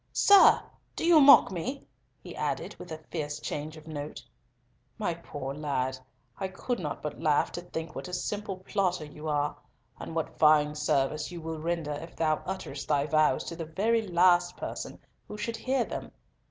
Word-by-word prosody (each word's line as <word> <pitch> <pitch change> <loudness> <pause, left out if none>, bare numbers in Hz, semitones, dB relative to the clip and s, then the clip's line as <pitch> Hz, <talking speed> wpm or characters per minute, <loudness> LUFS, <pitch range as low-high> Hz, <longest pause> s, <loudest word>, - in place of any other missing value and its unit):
Sir! 400 -1 +7 0.3
do - - -2
you 335 -3 +7
mock 275 -7 +8
me!" 245 - -4 0.4
he - - -9
added, - - -3
with 175 - -10
a 160 - -4
fierce 150 -3 -3
change 155 +2 -5
of 155 - -14
note. 145 -4 -6 0.7
"My 205 -6 -1
poor 145 -5 -6
lad, 135 -3 -2 0.4
I 190 - -1
could 195 +5 -3
not 150 -5 -5
but 150 - -5
laugh 150 -3 +2
to 175 - -5
think 165 -2 -6
what - - -6
a 180 - -9
simple 205 0 -3
plotter 185 -3 -1
you 150 +1 -9
are, 150 -1 0 0.4
and 165 - -7
what 160 - -3
fine 150 -1 +5
service 150 0 0
you 175 - -6
will 160 -1 -5
render 165 -1 -2
if 160 +4 -8
thou 155 -2 +1
utterest 185 -7 -5
thy 140 0 +2
vows 155 -2 +3
to 170 - -6
the 165 -1 -5
very 215 +8 +1
last 175 -2 +3
person - - -6 0.3
who 210 - -7
should 230 +2 -3
hear 260 +2 0
them! - - -6
165 Hz, 180 wpm, -29 LUFS, 150-190 Hz, 0.7 s, mock